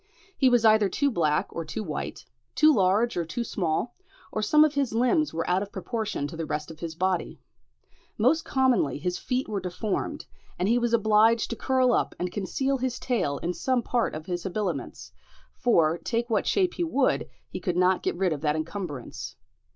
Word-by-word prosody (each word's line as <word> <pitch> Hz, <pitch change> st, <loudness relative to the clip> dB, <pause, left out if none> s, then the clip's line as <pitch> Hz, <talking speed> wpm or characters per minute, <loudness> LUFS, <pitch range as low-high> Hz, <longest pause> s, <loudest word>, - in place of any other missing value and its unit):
He 265 Hz, -, +4 dB
was 240 Hz, -2 st, +3 dB
either 215 Hz, -2 st, +5 dB
too 280 Hz, +8 st, +1 dB
black 155 Hz, -8 st, +1 dB
or 165 Hz, -, -4 dB
too 160 Hz, +7 st, -5 dB
white, 155 Hz, -6 st, -5 dB, 0.3 s
too 310 Hz, 0 st, +6 dB
large 205 Hz, +3 st, +2 dB
or 175 Hz, -, 0 dB
too 170 Hz, +9 st, -3 dB
small, 190 Hz, +2 st, -2 dB, 0.4 s
or 215 Hz, -, -2 dB
some 300 Hz, +9 st, +5 dB
of 300 Hz, -, 0 dB
his 275 Hz, -6 st, 0 dB
limbs 255 Hz, +6 st, +2 dB
were 165 Hz, +1 st, -3 dB
out 180 Hz, +2 st, +2 dB
of 200 Hz, 0 st, -6 dB
proportion 210 Hz, -, -3 dB
to 145 Hz, -, -6 dB
the 165 Hz, -1 st, -4 dB
rest 150 Hz, +2 st, -3 dB
of 155 Hz, -, -12 dB
his 165 Hz, -1 st, -5 dB
body. 185 Hz, 0 st, -1 dB, 0.8 s
Most 270 Hz, +9 st, +3 dB
commonly 255 Hz, -, +2 dB
his 180 Hz, +4 st, -3 dB
feet 255 Hz, +1 st, -2 dB
were 205 Hz, -2 st, -2 dB
deformed, 185 Hz, +3 st, -3 dB, 0.3 s
and 180 Hz, -, 0 dB
he 235 Hz, +3 st, +3 dB
was 240 Hz, -1 st, +2 dB
obliged 220 Hz, +1 st, +3 dB
to -, -, -2 dB
curl 255 Hz, 0 st, +2 dB
up -, -, 0 dB
and 180 Hz, 0 st, -3 dB
conceal 265 Hz, +8 st, -1 dB
his 255 Hz, 0 st, -2 dB
tail 220 Hz, -, -1 dB
in 175 Hz, +1 st, -1 dB
some 255 Hz, +4 st, 0 dB
part 240 Hz, -7 st, 0 dB
of 155 Hz, 0 st, -7 dB
his 175 Hz, -1 st, -3 dB
habiliments; 175 Hz, -, -4 dB, 0.4 s
for, 170 Hz, -8 st, +2 dB
take 235 Hz, 0 st, -2 dB
what 215 Hz, -, +1 dB
shape 370 Hz, -3 st, +2 dB
he 345 Hz, -, -2 dB
would, 285 Hz, -5 st, +1 dB, 0.2 s
he -, -, -6 dB
could 180 Hz, -3 st, -2 dB
not 185 Hz, 0 st, +3 dB
get -, -, -1 dB
rid 185 Hz, -3 st, +1 dB
of 145 Hz, -, -6 dB
that 150 Hz, -1 st, +1 dB
encumbrance. 160 Hz, -4 st, -5 dB
210 Hz, 195 wpm, -26 LUFS, 170-245 Hz, 0.8 s, too